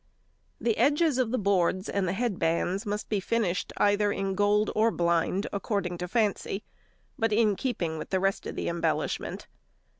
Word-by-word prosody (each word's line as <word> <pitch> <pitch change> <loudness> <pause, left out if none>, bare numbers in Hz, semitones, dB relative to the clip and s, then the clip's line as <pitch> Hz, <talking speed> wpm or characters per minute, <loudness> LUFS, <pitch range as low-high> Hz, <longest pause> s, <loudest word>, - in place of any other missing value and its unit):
] - - -42
The 225 - +2
edges 295 -2 +3
of 250 -3 +2
the 255 - 0
boards 190 -2 +1
and 200 -2 -1
the - - 0
headbands 195 -2 0
must 210 +1 -3
be 210 - 0
finished 195 -3 -1
either 205 0 +3
in 195 -1 -1
gold 205 +1 +2
or 220 +2 +3
blind, 170 +1 +1
according 200 -3 -2
to 180 - -3
fancy, 210 0 0 0.6
but 225 0 +1
in 215 -1 +3
keeping 175 -10 -2
with - - -7
the 190 - +1
rest 195 +1 0
of - - -5
the - - -3
embellishment. 170 0 -2
200 Hz, 175 wpm, -28 LUFS, 185-220 Hz, 0.6 s, edges